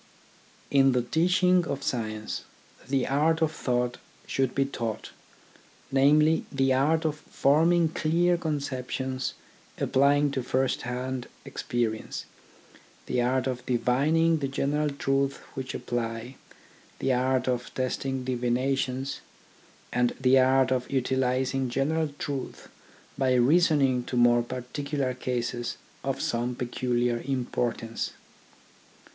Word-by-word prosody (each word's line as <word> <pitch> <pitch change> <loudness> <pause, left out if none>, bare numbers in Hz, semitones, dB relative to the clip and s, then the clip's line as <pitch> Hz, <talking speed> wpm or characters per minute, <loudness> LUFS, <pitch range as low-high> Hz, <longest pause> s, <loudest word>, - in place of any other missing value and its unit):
In 135 -1 +5
the 125 -1 +1
teaching 180 +6 +3
of 140 0 -3
science, 110 -4 -3 0.5
the 135 -1 +1
art 155 +4 +2
of 155 - +1
thought 125 -5 -1 0.3
should 130 -2 -1
be 135 - +2
taught: 115 -5 -4 0.8
namely, 150 +4 +4
the 135 -1 +2
art 155 +5 +2
of 155 -1 0
forming 165 +5 +3
clear 170 +3 +2
conceptions 130 -5 -3 0.4
applying 145 +2 +3
to 135 -1 -1
first 130 +1 0
hand 125 +1 -4 0.2
experi 115 -2 -2
ence, - - -7 0.8
the 125 - 0
art 130 +1 +1
of 125 -2 -3
divining 145 +7 +2
the 140 - -1
general 145 +2 0
truths 140 -1 0 0.2
which 135 -1 -5
apply, 115 +1 -3 0.6
the 135 - +1
art 130 0 +1
of 125 -1 -1
testing 130 0 -2
divinations, 130 +2 -1 0.7
and 120 0 +1
the 130 0 +5
art 130 0 +4
of 125 -1 0
utilising 130 0 0
general 155 +5 0
truths 140 -4 -5 0.5
by 130 -1 +3
reasoning 135 -1 +4
to 125 - -3
more 120 0 +5
particular 130 +2 -3
cases 120 -1 -3 0.3
of - - -2
some 120 +1 -1
peculiar 120 -1 -1
import 125 -3 -1
ance. 115 0 -4
130 Hz, 115 wpm, -27 LUFS, 125-140 Hz, 0.8 s, In